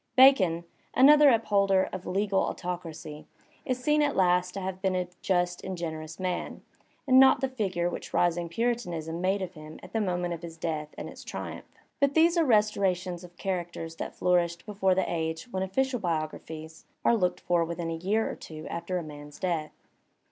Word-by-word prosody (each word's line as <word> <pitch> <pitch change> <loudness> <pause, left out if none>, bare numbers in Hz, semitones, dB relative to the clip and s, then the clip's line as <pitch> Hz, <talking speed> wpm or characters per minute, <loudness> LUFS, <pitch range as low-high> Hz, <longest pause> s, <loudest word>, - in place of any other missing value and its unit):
Bacon, 200 -11 +6 0.3
another 290 +2 +8
upholder 200 -5 +3
of 185 -1 -6
legal 195 +1 +1
autoc 180 0 -3
racy, 155 -2 -9 0.4
is 255 -3 0
seen 300 +4 +2
at 290 -1 +1
last 180 -1 +3
to - - -2
have 190 0 -4
been 190 -1 +1
a 180 -1 -1
just 175 -1 0
and 190 -1 -4
generous 160 -1 -5
man, 185 -1 -3 0.4
and 260 -1 +6
not 265 0 +7
the 265 - 0
figure 195 -9 -1
which 175 - -5
rising 175 -1 +1
Puritanism 175 -6 -2
made 190 +1 +1
of 185 0 -6
him 155 -1 -11
at - - -12
the 225 - +1
onoment 180 -3 -1
of 170 - -7
his 165 -1 -8
death 155 -2 -3
and - - -5
its - - -10
triumph. - - -7 0.3
But 280 0 +2
these 335 +2 +5
are 335 - +4
res 215 -6 +4
torations 180 -3 -1
of 175 0 -13
characters 175 -3 -4
that - - -5
flourished 175 -1 +1
before 195 -3 +1
the 190 - +1
age 160 -1 -2
when 190 - -2
official 250 +7 0
biographies 160 -2 -4 0.2
are 235 - +5
looked 180 -5 0
for 175 -1 +2
within 170 0 -3
a - - -2
year 200 +7 0
or - - -4
two 155 -1 -9
after 170 +2 -3
a 175 - -3
man's 145 -1 -10
death. 165 -5 -2
180 Hz, 190 wpm, -28 LUFS, 170-210 Hz, 0.4 s, another